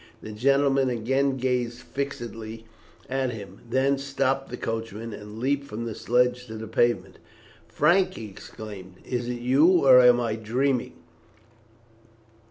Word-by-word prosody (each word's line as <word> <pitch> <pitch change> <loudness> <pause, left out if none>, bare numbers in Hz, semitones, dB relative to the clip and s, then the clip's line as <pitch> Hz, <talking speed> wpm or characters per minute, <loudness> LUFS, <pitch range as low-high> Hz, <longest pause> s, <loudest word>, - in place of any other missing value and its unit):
The 110 - -7
gentleman 135 +3 +2
again 135 +3 0
gazed 125 -2 -1
fixedly 115 -5 -6 0.4
at 135 0 -1
him, 100 -3 -10
then 135 +2 +2
stopped 135 -1 -1
the - - -6
coachman, 115 0 -4
and 105 +1 -9
leaped 140 +3 -1
from 115 -2 -5
the 115 - -4
sledge 125 +2 +1
to 110 - -7
the 110 0 -7
pavement. 105 -4 0 0.5
"Frank!" 185 +4 +2
he 110 - -7
exclaimed, 95 -2 -10
"is 120 -1 -3
it 120 -1 -4
you, 145 +7 +4
or 130 -1 +9
am 125 -1 +6
I 115 -2 -1
dreaming?" 125 +4 0
125 Hz, 140 wpm, -26 LUFS, 110-135 Hz, 0.5 s, or